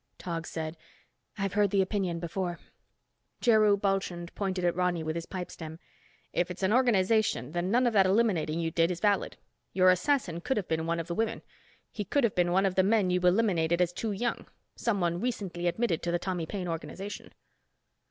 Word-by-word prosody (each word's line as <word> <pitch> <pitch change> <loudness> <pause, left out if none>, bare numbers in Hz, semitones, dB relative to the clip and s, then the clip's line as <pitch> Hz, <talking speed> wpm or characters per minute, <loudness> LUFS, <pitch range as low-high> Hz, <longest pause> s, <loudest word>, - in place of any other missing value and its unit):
Tog 165 -2 -4
said, 160 0 -5 0.6
"I've 195 -2 -2
heard 205 0 +3
the 195 0 +3
opinion 185 -4 -2
before." 175 0 -3 0.8
Jheru 215 -4 +4
Bulchand 190 -3 -2
pointed 190 -3 -2
at 175 - +2
Ronny 180 -2 0
with 155 0 -2
his 170 0 -5
pipe 180 -2 -5
stem. 160 -1 -8 0.6
"If 175 +1 0
its 180 +2 -6
an 190 +3 +3
organization, 215 - +2
then 175 +2 -1
none 245 +4 +3
of 240 - +2
that 195 -3 +5
eliminating 185 -6 +1
you 165 -1 -1
did 165 +1 +2
is 175 -2 -3
valid. 205 +1 +1 0.4
Your 185 -1 +6
assassin 180 - 0
could 265 - -1
have 200 - -2
been 160 0 -1
one 170 0 0
of 165 - -3
the 170 - -4
women. 225 +5 -1 0.5
He 210 - -4
could 275 +8 0
have 230 - +2
been 175 -1 +2
one 190 +2 +3
of 190 - +1
the 190 - +4
men 200 -1 +2
you 180 - +2
eliminated 180 -3 +2
as 175 -1 +2
too 220 +4 -3
young—someone 200 -4 -2
recently 195 -8 -2
admitted 175 -1 0
to 175 - -2
the 175 - +2
Tommy 175 -2 -3
Paine 190 -1 -4
organization." 190 +4 -6
185 Hz, 190 wpm, -29 LUFS, 170-205 Hz, 0.8 s, Your